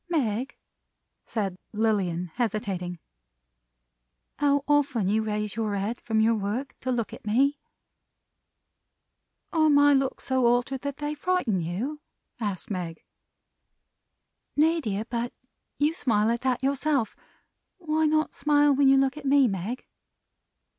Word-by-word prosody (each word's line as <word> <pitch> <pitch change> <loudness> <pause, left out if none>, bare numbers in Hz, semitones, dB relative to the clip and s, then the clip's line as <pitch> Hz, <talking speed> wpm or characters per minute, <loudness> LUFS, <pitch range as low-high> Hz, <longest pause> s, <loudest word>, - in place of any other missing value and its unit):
"Meg," 260 -6 -1 0.7
said 195 -5 -3
Lilian, 190 -6 0
hesitating. 195 -6 -2 1.4
"How 285 -1 +3
often 285 -8 +2
you 215 +3 +2
raise 210 -1 -2
your 215 -2 -1
head 205 +4 -3
from 220 -1 0
your 225 +1 +4
work 220 +6 -3
to 260 - -2
look 235 -3 -2
at - - -10
me!" 275 +7 +2 1.9
"Are 315 -2 +4
my 290 0 +6
looks 270 -1 0
so 260 -2 +2
altered, 245 +2 +1
that 285 -1 -4
they 295 0 -3
frighten 300 - 0
you?" 225 - -3 0.4
asked 205 -3 -4
Meg. 175 -4 -4 1.5
"Nay, 320 +3 +3
dear! 210 -3 -2
But 240 0 -3 0.4
you 295 +2 +2
smile 220 -7 +1
at 235 - -1
that 260 -1 0
yourself! 275 -2 0 0.6
Why 315 -3 +1
not 310 0 +1
smile 290 0 +3
when 275 0 +4
you 270 0 +6
look 270 +1 +2
at 300 - -8
me, 275 -1 +5
Meg?" 205 +5 -4
245 Hz, 130 wpm, -26 LUFS, 210-285 Hz, 1.9 s, my